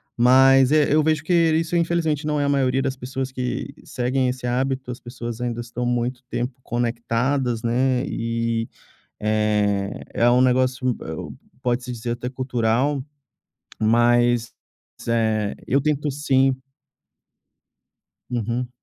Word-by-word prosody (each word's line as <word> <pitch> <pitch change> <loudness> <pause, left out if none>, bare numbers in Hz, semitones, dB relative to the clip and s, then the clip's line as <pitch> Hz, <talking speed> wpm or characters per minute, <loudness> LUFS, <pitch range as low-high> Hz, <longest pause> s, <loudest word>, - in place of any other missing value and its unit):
Mas, 130 +2 +6
eh, 150 -1 +4
eu 155 - +5
vejo 155 -1 +1
que 180 - 0 0.2
isso, 165 +2 0
infelizmente, 165 -3 0
não 150 -1 0
é - - +1
a - - +1
maioria 135 -1 +2
das 135 -1 -1
pessoas 130 +1 -5
que 130 +2 -4
seguem 130 +1 0
esse 125 -1 -5
hábito, 130 +1 -1
as 120 - -7
pessoas 120 -1 -7
ainda 120 -1 -2
estão 120 +1 -4
muito 120 +1 -1
tempo 125 +1 -2
conectadas, 120 +1 -1
né, 125 +2 +1
e, 115 0 -2 0.5
eh, 105 -2 0
é 120 - +3
um 125 +1 +4
negócio 130 0 +2
m 125 - +1
eh, 80 - -6 0.5
pode-se 125 0 -1
dizer 120 0 -4
até 120 +1 -5
cultural, 130 +1 0 0.8
mas, 120 0 +3 0.6
eh, 110 -3 +1
eu 140 +2 +2
tento, 150 0 0
sim 135 -2 +2 1.8
Uhum. 120 +1 -2
125 Hz, 135 wpm, -23 LUFS, 120-135 Hz, 1.8 s, Mas